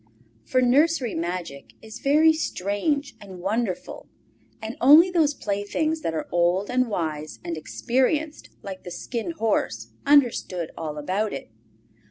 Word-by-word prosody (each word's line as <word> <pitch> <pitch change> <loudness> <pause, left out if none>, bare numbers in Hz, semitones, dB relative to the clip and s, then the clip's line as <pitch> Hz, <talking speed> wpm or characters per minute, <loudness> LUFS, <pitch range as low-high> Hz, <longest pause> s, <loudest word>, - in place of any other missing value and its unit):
For 255 0 +2
nursery 270 0 +3
magic 170 -4 -5
is 220 0 -10
very 310 +3 +5
strange 280 - -2
and 190 -3 -10
wonderful, 200 +1 -3 0.5
and 220 +3 -6
only 310 +8 +8
those 310 -5 +2
playthings 215 +11 -2
that 165 - -2
are 155 - -3
old 175 +4 +1
and 255 -1 +1
wise 155 -6 -3
and 170 -1 -3
experienced 265 - -1
like 190 -1 -7
the 180 - -9
Skin 235 - -5
Horse 205 - -1
understand 240 - +2
all 155 -2 -5
about 190 +8 -1
it. 135 - -7
220 Hz, 135 wpm, -24 LUFS, 175-285 Hz, 0.5 s, only